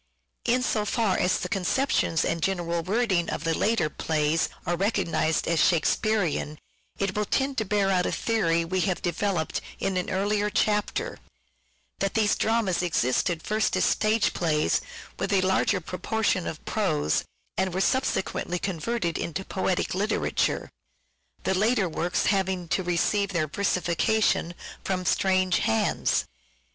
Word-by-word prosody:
In 250 +1 +2
so 215 -4 0
far 210 -2 +1
as 180 - +2
the - - -3
conceptions 200 -3 +1
and 170 - -1
general 170 -2 -1
wording 190 -2 +1
of 150 - -3
the 165 0 +1
later 220 -4 +1
plays 155 +1 0 0.2
are 175 - 0
recognized 165 -5 0
as 170 -1 +2
Shakespearean, 175 -3 +1 0.4
it 195 -1 -1
will 210 0 0
tend 270 +3 0
to 220 - -1
bear 200 -1 +1
out 180 -1 +2
a - - -1
theory 170 -8 +1
we 185 +2 -1
have 185 -2 -1
developed 175 -1 -1 0.2
in 190 -1 -1
an 180 - -2
earlier 205 +2 0
chapter, 210 0 0 0.8
that 195 +1 -1
these 215 -2 +3
dramas 220 -6 +1
existed 165 +1 0
first 215 +1 0
as - - +3
stage 215 +1 +2
plays 155 -3 +1 0.4
with - - -1
a 195 -2 +4
larger 190 +1 +2
proportion 185 +2 -1
of 160 - -6
prose, 155 - 0 0.3
and 190 0 0
were 185 - -2
subsequently 190 -4 0
converted 180 0 -2
into 190 +4 -4
poetic 190 -1 -1
literature; 205 +4 0 0.7
the 190 - +1
later 215 +1 +2
works 175 +2 -1
having 190 -3 0
to - - +1
receive 185 +3 0
their 155 -3 +1
versification 180 +1 +1 0.3
from 185 -1 -2
strange 185 -1 +2
hands. 110 -9 +1
185 Hz, 145 wpm, -26 LUFS, 170-210 Hz, 0.8 s, a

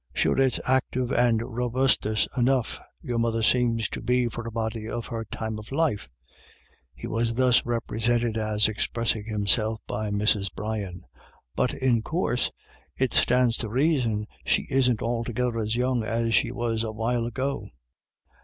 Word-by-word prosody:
" - - -28
Sure - - +2
it's 135 -1 +3
active 130 -1 0
and 120 -3 +3
robustuous 120 -2 +1
enough 125 -1 +1 0.2
your 120 -5 -2
mother 115 -1 0
seems 115 -2 +2
to - - -5
be 125 0 +2
for 120 0 -5
a - - -5
body 110 0 -3
of 120 -1 -4
her 115 -2 -4
time 110 0 -4
of 110 - -11
life 140 -9 0 0.3
" - - -28
— - - -36
he - - -8
was 115 +1 0
thus 125 -1 +4
represented 120 0 0
as 110 -1 +2
expressing 110 0 -1
himself 110 +1 +2
by 105 0 -3
Mrs. 105 -1 +1
Brian 100 -4 -4 0.2
— - - -26
" - - -46
but 125 - 0
in 125 -4 +2
coorse 155 -2 0 0.5
it 130 -1 0
stands 125 -1 +3
to 110 - -4
raison 125 -5 +1 0.2
she - - +1
isn't 125 -4 +2
altogether 120 0 -1
as 110 +1 -1
young 125 0 +1
as 115 +1 -1
she 115 - +3
was 120 -2 -1
a 110 - -3
while 115 +2 -1
ago." 130 -3 -3
115 Hz, 170 wpm, -26 LUFS, 110-125 Hz, 0.5 s, thus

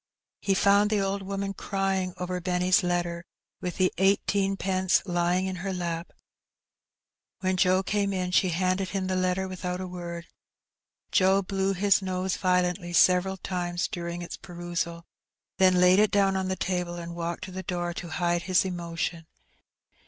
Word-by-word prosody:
He 195 - +1
found 200 +2 +4
the 215 -1 +1
old 195 0 -1
woman 195 0 -3
crying 195 -2 -1
over 180 0 -3
Benny^s 180 +2 +2
letter, 175 -1 -1 0.4
with 180 -2 -4
the 185 -1 +2
eighteenpence 195 -1 +2
lying 175 0 +1
in 190 -1 -3
her 190 +2 -3
lap. 170 -2 -3 1.3
When 185 -1 +1
Joe 185 +1 +3
came 200 0 0
in 185 -2 -2
she 185 0 +3
handed 185 +2 0
him 195 -2 -2
the 185 0 -1
letter 185 +1 0
without 180 -1 -4
a 185 - -4
word. 175 -1 -6 0.9
Joe 190 +1 +4
blew 195 +1 0
his 200 +1 +3
nose 185 0 -1
violently 180 -1 0
several 185 +2 +4
times 175 -2 -2
during 170 0 -5
its 175 - -7
perusal, 175 -2 -5 0.5
then 185 -1 +5
laid 180 +2 +6
it 210 0 +5
down 195 -1 +2
on 190 0 -1
the 190 - -1
table, 180 -1 -2
and 170 0 -6
walked 170 +1 -4
to 190 - -7
the 185 +1 -5
door 175 -1 -3
to 175 0 -7
hide 175 +1 0
his 185 +2 +2
emotion. 170 -2 -4
185 Hz, 160 wpm, -27 LUFS, 175-190 Hz, 1.3 s, laid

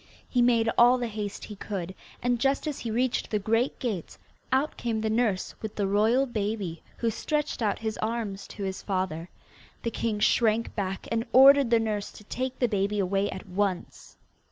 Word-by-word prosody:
He 250 - +1
made 235 -2 +4
all 245 +2 +7
the 245 - -2
haste 210 -3 -5
he 210 - -8
could, 190 -3 -5 0.3
and 245 -1 +1
just 270 +5 +1
as 300 -3 -3
he 235 - -4
reached 245 +3 0
the 215 - +1
great 225 +5 +1
gates 210 -10 -4 0.3
out 270 +4 +1
came 230 -2 -2
the 220 0 0
nurse 220 -5 0
with 220 -1 -5
the 205 - 0
royal 220 +7 +3
baby, 205 -7 -3 0.2
who 230 -1 0
stretched 300 +3 -2
out 210 -3 +1
his 220 -1 -4
arms 215 -3 -3
to 205 - -7
his 190 -1 -3
father. 185 -4 -2 0.5
The 230 - -1
king 220 -2 -1
shrank 225 +1 +2
back, 195 -2 -3
and 230 0 0
ordered 275 0 +8
the 230 -1 +4
nurse 210 -2 -2
to - - -13
take 255 +4 -4
the 245 - +2
baby 205 -1 0
away 195 +1 +1
at 190 +2 -7
once. 185 -1 -3
220 Hz, 190 wpm, -27 LUFS, 200-240 Hz, 0.5 s, ordered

